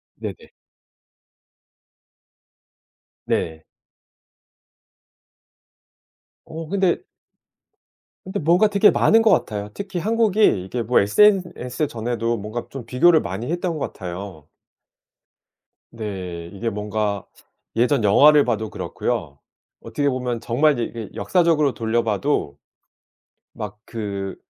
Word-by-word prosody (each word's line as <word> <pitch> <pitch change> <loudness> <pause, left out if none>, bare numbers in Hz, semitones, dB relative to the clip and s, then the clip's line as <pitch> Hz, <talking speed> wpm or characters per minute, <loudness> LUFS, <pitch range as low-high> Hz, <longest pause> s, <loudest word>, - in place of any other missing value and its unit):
네네. - - -8 2.7
네. 80 -1 -2 2.8
어 160 0 -7
근데 195 - +1 1.2
근데 190 - -4
뭔가 175 +7 +4
되게 205 0 +5
많은 225 +1 +4
것 225 -2 +4
같아요. 105 - 0
특히 190 -3 -5
한국이 215 - +2
이게 120 +5 -3
뭐 120 +3 +3
SNS 155 - +2
전에도 115 0 -2
뭔가 110 +4 -5
좀 135 -4 -8
비교를 155 +7 +4
많이 110 +9 -5
했던 175 -1 -2
것 145 - -4
같아요. 90 -4 -8 1.4
네. 95 -6 -6
이게 115 +4 -3
뭔가 105 -1 -2 0.5
예전 120 +1 +2
영화를 145 +8 +6
봐도 110 -3 -1
그렇고요. 70 -7 -4 0.4
어떻게 145 -1 -1
보면 125 -2 -2
정말 145 +7 +2
이제 120 - -2
이게 115 -1 -6
역사적으로 165 -6 +2
돌려 115 0 0
봐도 105 - -1 1.0
막 105 -1 -7
그 100 -4 -5
120 Hz, 205 characters per minute, -22 LUFS, 105-165 Hz, 2.8 s, 영화를